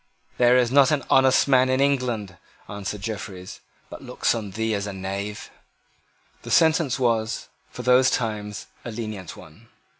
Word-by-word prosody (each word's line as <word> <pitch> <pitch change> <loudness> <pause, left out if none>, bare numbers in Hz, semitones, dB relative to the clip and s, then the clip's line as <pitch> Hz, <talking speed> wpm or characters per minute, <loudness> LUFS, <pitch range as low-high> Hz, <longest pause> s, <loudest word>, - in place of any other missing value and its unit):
"There 125 0 +5
is 125 -2 +2
not 140 0 +5
an 150 -4 0
honest 130 +1 +4
man 130 -1 +4
in 130 0 +1
England," 125 -9 0 0.3
answered 100 0 -6
Jeffreys, 100 -4 -7 0.3
"but - - -10
looks - - -1
on 110 -3 -5
thee 110 +3 -2
as 100 0 -2
a 100 - -5
knave." 100 +2 -6 0.9
The - - -10
sentence 160 -5 +3
was, 115 -3 -1 0.2
for 125 - -8
those 125 +1 +5
times, 105 -3 -3 0.2
a - - -6
lenient 110 -5 -7
one. 100 +10 -16
115 Hz, 155 wpm, -24 LUFS, 105-130 Hz, 0.9 s, There